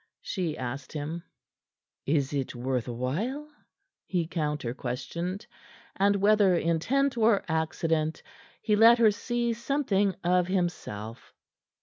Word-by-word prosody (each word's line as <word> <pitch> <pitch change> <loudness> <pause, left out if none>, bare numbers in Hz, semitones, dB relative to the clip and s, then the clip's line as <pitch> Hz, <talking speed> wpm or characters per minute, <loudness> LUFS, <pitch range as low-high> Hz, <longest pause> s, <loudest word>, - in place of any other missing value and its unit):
she 175 -7 -2
asked 130 +2 -5
him. 155 +3 -4 0.9
"Is 140 -1 +1
it 135 -3 -2
worth 125 0 -2
while?" 170 - -3 0.6
he 175 -3 0
counter 150 -7 -2
questioned, 170 - -4 0.5
and, 200 +1 +3
whether 200 -2 +4
intent 245 - +1
or 220 -2 +4
accident, 160 -1 -1 0.4
he 210 - +3
let 230 +3 +7
her 225 -2 +5
see 235 +2 -1
something 225 -6 0
of 180 0 +2
himself. 160 - -3
175 Hz, 110 wpm, -28 LUFS, 145-210 Hz, 0.9 s, let